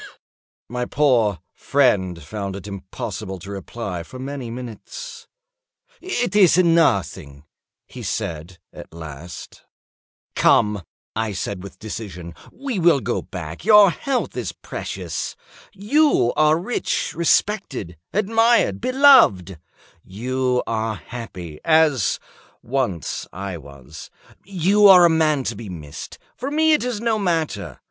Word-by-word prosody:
My 125 0 -3
poor 120 - +2
friend 95 - +1
found 100 +3 -5
it 100 - -8
impossible 100 0 -6
to 95 +3 -10
reply 100 -2 -5
for 105 +10 -11
many 135 -2 -6
minutes. 120 -2 -8 0.7
"It 245 - -2
is 190 -5 +6
nothing," 95 - +2 0.4
he - - -10
said, 85 +3 -4 0.2
at - - -11
last. 80 0 -9 0.7
"Come," 105 -2 +3 0.3
I 110 -1 -1
said, 95 0 -4
with 100 - -11
decision, 95 -6 -7 0.2
"we 260 -6 -4
will 165 -4 +4
go 120 -1 -2
back; 85 - -8
your 210 -2 +7
health 265 +7 -2
is - - -4
precious. - - -5 0.4
You 215 - +2
are 155 +1 +4
rich, 190 +9 -2
respected, 170 - 0 0.2
admired, 225 +3 +2
beloved; 250 - +5 0.4
you 125 +5 -1
are 110 -1 -2
happy, 90 -11 -9
as 155 - +3 0.4
once 120 - -2
I 95 0 -5
was. 70 +1 -12 0.3
You 200 +2 +3
are 180 -2 +9
a 170 - +5
man 155 -4 +2
to 115 - -3
be 110 -1 -8
missed. 75 -4 -8 0.2
For 265 - -4
me 315 +2 +3
it 300 - +2
is 245 -4 -2
no 230 -2 +1
matter. 165 -5 -2
125 Hz, 125 wpm, -21 LUFS, -, 0.7 s, are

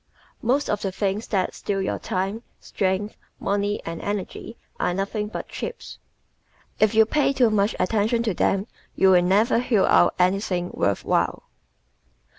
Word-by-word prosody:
Most 265 +5 +1
of 210 - -1
the 195 - -2
things 200 +3 -2
that 190 -3 0
steal 200 -1 -3
your 190 - -2
time, 195 +4 -2 0.2
strength, 195 +2 -2 0.2
money 205 +1 -1
and 165 0 -5
energy 205 +3 -5 0.2
are 175 - 0
nothing 205 +2 -2
but 210 - -6
chips. 480 - -7 0.8
If 215 0 +3
you 220 0 +7
pay 280 +3 +1
too 245 -4 +3
much 205 0 +1
attention 220 +5 +1
to 220 -4 0
them 195 +3 +1 0.3
you 190 - +5
will 180 -1 +6
never 205 +7 +3
hew 230 -6 +2
out 175 - +4
anything 180 -1 0
worth 100 - -1
while. - - 0
205 Hz, 155 wpm, -24 LUFS, 190-220 Hz, 0.8 s, you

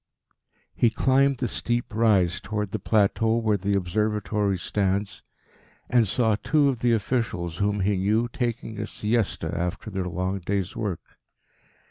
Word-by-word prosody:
He 120 - +3
climbed 135 +3 +2
the 125 - -1
steep 120 0 -2
rise 100 -6 +3
towards 105 -1 -3
the - - -2
plateau 110 +1 +2
where 110 -2 +1
the 100 0 0
Observatory 105 +1 0
stands, 100 +2 -1 0.7
and 120 -3 +4
saw 110 +2 +2
two 145 +2 +3
of 130 -4 -2
the 120 0 +2
officials 105 -7 -1
whom 100 0 0
he 100 +1 +1
knew 105 +5 +1
taking 120 -2 -3
a 105 - -3
siesta 110 0 -1
after 90 +5 -3
their 95 -2 -2
long 95 +3 -2
day's 95 0 -2
work. 100 -6 -5
105 Hz, 145 wpm, -25 LUFS, 95-115 Hz, 0.7 s, and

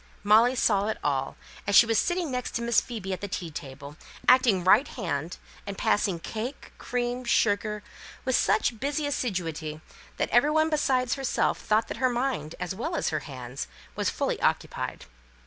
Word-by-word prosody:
Molly 225 +5 +5
saw 205 -4 +2
it 220 - -1
all, 135 -2 -1 0.3
as 200 - +2
she - - +9
was 225 -1 +2
sitting 350 -4 0
next 250 -1 -3
to 235 - -1
Miss 235 -1 +3
Phoebe 210 -6 -5
at 185 - -5
the 200 - -3
tea 175 -4 -5
table, 140 +1 -9 0.3
acting 245 -8 +5
right 215 +10 +5
hand, 150 +5 -4 0.3
and 200 -1 -5
passing 195 -4 +1
cake, 225 - -6
cream, 245 0 -2
sugar, 210 -2 +1 0.4
with 260 -1 +2
such 220 +1 +2
busy 290 +4 -1
assiduity 165 - -3 0.4
that - - -1
every 240 +5 +5
one 315 +1 +2
besides 260 -5 +1
herself 270 -2 0
thought 220 +1 +1
that - - -5
her 260 -1 +2
mind, 240 - -2
as 180 0 -3
well 315 - -3
as - - 0
her 155 - -1
hands, 130 -2 -7 0.3
was - - 0
fully - - -2
occupied. - - -1
220 Hz, 175 wpm, -27 LUFS, 180-255 Hz, 0.4 s, she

